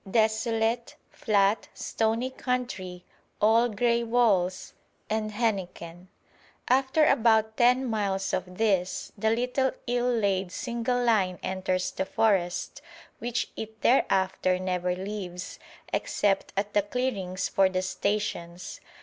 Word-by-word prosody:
Desolate, 225 +2 +1 0.2
flat, 205 0 +1
stony 225 +3 -1
country, 245 -9 -4 0.3
all 230 +3 +4
grey 235 +2 +1
walls 210 -6 +1 0.4
and 215 0 0
henequen. 185 -5 -3 0.6
After 265 +4 +3
about 220 -5 +3
ten 250 +3 +4
miles 195 -3 -1
of 180 0 -3
this, 195 -5 0
the 220 +2 0
little 250 +3 +1
ill 245 0 0
laid 195 -5 0
single 240 +2 -1
line 195 -6 +2
enters 185 -1 -1
the 190 - -2
forest, 190 -4 0 0.4
which 240 0 -2
it 220 0 -8
thereafter 190 -6 +2
never 180 -1 -1
leaves, 185 -2 -6 0.3
except 195 -2 0
at 205 +1 -1
the 205 - +4
clearings 200 -4 -2
for 195 -1 +3
the 185 0 -1
stations. 185 -3 -3
210 Hz, 115 wpm, -27 LUFS, 185-235 Hz, 0.6 s, all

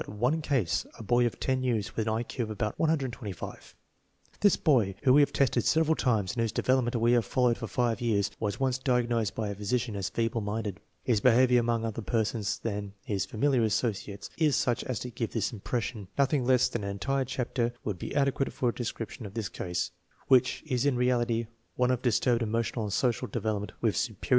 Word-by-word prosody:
one 125 +10 0
case, 130 - 0
a - - -8
boy 120 +3 +3
of 115 - -6
10 130 -1 0
years 115 -6 -1
with 110 -1 -1
an 110 - +1
I 115 - -1
Q 120 0 -3
of - - -9
about 105 0 -3
125. 130 - -3 0.6
This 205 -2 +5
boy, 115 - +2
whom 130 -2 +5
we 145 - +7
have 145 - +3
tested 125 -3 +2
several 160 0 +3
times 110 -10 +1
and 120 - -1
whose 115 -2 0
development 130 -2 +1
we 115 0 +3
have 120 -1 +4
fol 125 +5 -1
lowed 120 -1 +3
for 115 - -4
five 120 +1 0
years, 100 -4 +1
was 105 -2 -2
once 130 -1 +1
diagnosed 120 -5 +1
by 110 -2 -2
a 100 - -4
physician 110 +2 -1
as 95 -2 -2
feeble 115 0 -1
minded. 105 -1 -3 0.2
His 115 -5 +1
behavior 125 0 +5
among 115 -1 0
other 115 0 -3
persons 110 -1 -1
than 100 -3 -4
bis 100 -2 -1
familiar 130 +4 +1
associates 105 -2 -1
is 150 -5 +3
such 120 -2 +1
as 130 -4 -2
to 125 - -5
give 115 -1 -4
this 115 +1 -1
impression. 115 -1 -3
Nothing 140 -1 +2
less 130 -1 +4
than - - -4
an 100 - -2
entire 135 +7 -1
chapter 120 -1 -1
would 100 -4 -3
be - - -5
adequate 140 -1 +1
for 125 - 0
a - - -2
description 115 -1 -5
of 100 - -13
this 110 -5 -2
case, 90 0 -3 0.4
which 130 -1 +3
is 130 -5 0
in 140 -2 +2
reality 120 -2 +1 0.3
one 125 0 +2
of 125 -1 0
dis 120 -5 +2
turbed 120 -2 +2
emotional 115 0 -1
and 105 - -4
social 120 -4 +1
development 105 -2 -2
with 110 -3 +2
superior 110 - -1
intelligence. - - -6
120 Hz, 215 wpm, -29 LUFS, 105-125 Hz, 0.6 s, we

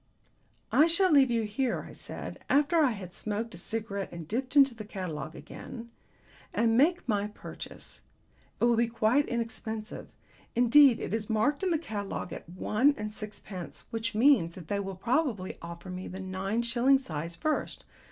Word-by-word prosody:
"I 310 - +6
shall 360 +2 +4
leave 275 -3 +6
you 230 -2 +1
here," 230 +4 -1
I - - -11
said, - - -5
after 295 +4 +3
I 290 - +5
had 195 -6 -6
smoked 215 +4 -3
a - - -9
cigarette 200 -1 -3
and 170 -2 -8
dipped 255 - -3
into 275 -3 +7
the 220 -2 -8
catalogue 165 -7 -5
again, 235 -2 -9 0.6
"and 225 0 +3
make 320 +6 +3
my 205 -2 +1
purchase. 210 - -9 0.6
It - - -2
will 240 0 +4
be 235 +1 +3
quite 230 +5 +2
inexpensive; 225 -2 -4 0.5
indeed, 245 +1 +6
it - - -4
is 220 -1 -2
marked 230 +7 +1
in 380 - +1
the 335 - +2
catalogue 210 -10 -5
at - - -9
one 215 +10 +2
and 210 0 -4
six 210 -1 -8
pence, 175 -7 -8
which 230 0 -3
means 220 - +4
that 170 -4 -11
they 200 - 0
will 195 -1 -4
probably 235 - -1
offer 170 +2 -8
me 185 +1 -5
the 190 - -7
nine 190 +4 -2
shilling 245 +3 +4
size 165 - -5
first. 310 - -2
225 Hz, 175 wpm, -29 LUFS, 195-260 Hz, 0.6 s, into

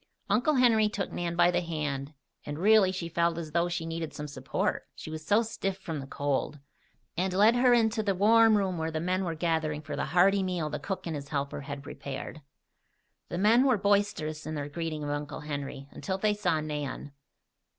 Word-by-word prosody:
Uncle 245 +9 +3
Henry 225 -4 +4
took 205 -1 -3
Nan 170 -1 -3
by 175 +1 +5
the - - +1
hand, 150 -4 -4 0.3
and, 145 0 -5
really 200 +1 +5
she 185 -3 -4
felt 170 0 +1
as 160 -2 -5
though 170 +2 +1
she 170 -1 -3
needed 165 -1 -4
some 150 - -5
support, 145 - -2
she 155 - -8
was 155 0 -6
so 205 +8 +3
stiff 195 -4 -3
from 165 -5 -5
the 135 - -7
cold, 145 +1 -1 0.6
and 185 +2 0
led 210 +5 +5
her 250 0 +4
into 225 -2 +3
the 200 -3 0
warm 220 +2 +5
room 190 -4 -1
where 160 0 -1
the 160 -1 -3
men 185 +3 0
were 170 -3 -2
gathering 160 -2 0
for 150 - -5
the - - -1
hearty 185 +5 +4
meal 180 -5 -2
the 150 - -3
cook 190 +6 -4
and 165 -2 -3
his 140 -1 -6
helper 140 -1 -3
had 140 0 -7
prepared. 140 +2 -7 0.9
The 175 - -3
men 220 +6 +5
were 260 -4 +4
boisterous 200 -7 0
in 155 - -3
their 145 -1 -4
greeting 155 0 -4
of 145 - -2
Uncle 145 0 -4
Henry, 140 -2 -5
until 190 -1 -3
they 210 +2 +2
saw 165 -6 0
Nan. 145 -2 -4
170 Hz, 205 wpm, -29 LUFS, 150-200 Hz, 0.9 s, by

